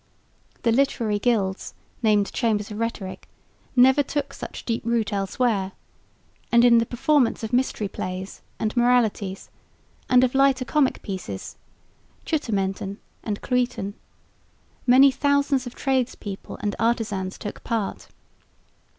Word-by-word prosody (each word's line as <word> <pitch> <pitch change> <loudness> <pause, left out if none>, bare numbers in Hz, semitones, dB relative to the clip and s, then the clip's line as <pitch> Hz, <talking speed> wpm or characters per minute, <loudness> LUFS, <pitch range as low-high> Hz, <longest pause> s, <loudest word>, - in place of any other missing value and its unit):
The 230 - +3
literary 230 -4 +1
gilds, 200 -5 0 0.3
named 210 -3 +2
Chambers 215 -4 0
of 210 - -6
Rhetoric, 220 -5 -4 0.5
never 265 +3 +6
took 285 +1 -3
such - - -8
deep 230 -1 -1
root 225 -2 0
elsewhere; 195 0 0 0.8
and 235 0 +6
in 235 -1 +7
the 230 - 0
performance 255 -1 +2
of 220 +2 -4
Mystery 245 -4 +1
Plays 185 0 -6 0.2
and 215 +1 -2
Moralities 235 -6 +1 0.6
and 250 0 +6
of 255 - +2
lighter 270 -1 +3
comic 285 0 +1
pieces 180 - -6 0.7
(chuttementen 195 - -1 0.3
and 210 -2 -4
cluyten) 245 -6 -1 0.9
many 265 +3 +7
thousands 280 -1 +1
of 245 - -9
tradespeople 255 -7 -2
and 205 -1 -1
artisans 215 -5 -1
took 210 - -7
part. 225 -4 -3
230 Hz, 120 wpm, -24 LUFS, 205-255 Hz, 0.9 s, in